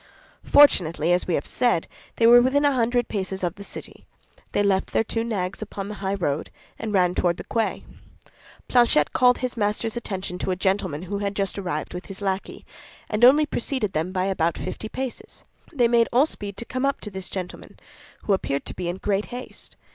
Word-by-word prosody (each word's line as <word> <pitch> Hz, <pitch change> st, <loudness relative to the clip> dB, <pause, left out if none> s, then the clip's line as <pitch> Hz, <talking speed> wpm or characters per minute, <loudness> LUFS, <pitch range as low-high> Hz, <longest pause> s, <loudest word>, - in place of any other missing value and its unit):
Fortunately, 175 Hz, -, +5 dB
as 180 Hz, -, 0 dB
we 175 Hz, -, +1 dB
have 140 Hz, -, -2 dB
said, 240 Hz, -9 st, +1 dB, 0.3 s
they 230 Hz, -, +2 dB
were 240 Hz, +1 st, +9 dB
within 280 Hz, +4 st, +2 dB
a 285 Hz, -, +5 dB
hundred 240 Hz, -1 st, +1 dB
paces 190 Hz, -2 st, -3 dB
of 175 Hz, -2 st, 0 dB
the 200 Hz, +1 st, -10 dB
city; -, -, -9 dB, 0.4 s
they 205 Hz, -, +1 dB
left 195 Hz, -1 st, +1 dB
their -, -, +3 dB
two 225 Hz, +1 st, -2 dB
nags 195 Hz, -5 st, -3 dB
upon 200 Hz, -2 st, -6 dB
the -, -, -5 dB
high 195 Hz, 0 st, -1 dB
road, 155 Hz, -5 st, -2 dB, 0.3 s
and 220 Hz, -, -4 dB
ran 180 Hz, -3 st, +3 dB
toward 175 Hz, -1 st, +1 dB
the -, -, -7 dB
quay. 225 Hz, -1 st, -2 dB, 0.8 s
Planchet 240 Hz, -, +3 dB
called 250 Hz, -1 st, +4 dB
his 255 Hz, -1 st, -3 dB
master's 215 Hz, +1 st, 0 dB
attention 190 Hz, -6 st, -4 dB
to -, -, -2 dB
a 185 Hz, -, +1 dB
gentleman 185 Hz, -4 st, -1 dB
who 200 Hz, +2 st, -4 dB
had 200 Hz, 0 st, -2 dB
just 195 Hz, 0 st, -1 dB
arrived 175 Hz, -6 st, -4 dB
with 180 Hz, +1 st, -7 dB
his 195 Hz, -1 st, -6 dB
lackey, 195 Hz, -1 st, -3 dB, 0.5 s
and 210 Hz, +2 st, 0 dB
only 285 Hz, +5 st, +7 dB
preceded 245 Hz, -6 st, -2 dB
them 160 Hz, +4 st, -1 dB
by 185 Hz, 0 st, 0 dB
about 170 Hz, -4 st, 0 dB
fifty 220 Hz, -, -5 dB
paces. 260 Hz, 0 st, -6 dB, 0.3 s
They 250 Hz, -7 st, +3 dB
made 235 Hz, -1 st, +3 dB
all 255 Hz, +4 st, +5 dB
speed 205 Hz, -10 st, -5 dB
to 235 Hz, -, -5 dB
come 255 Hz, +2 st, -3 dB
up 275 Hz, 0 st, +1 dB
to 210 Hz, -, -5 dB
this 190 Hz, -1 st, -5 dB
gentleman, 185 Hz, -2 st, -7 dB, 0.5 s
who 205 Hz, -, +2 dB
appeared 140 Hz, -7 st, -1 dB
to -, -, -5 dB
be 180 Hz, -2 st, -4 dB
in 175 Hz, -, -3 dB
great 200 Hz, +1 st, -1 dB
haste. 250 Hz, +1 st, -8 dB
200 Hz, 205 wpm, -24 LUFS, 185-235 Hz, 0.8 s, were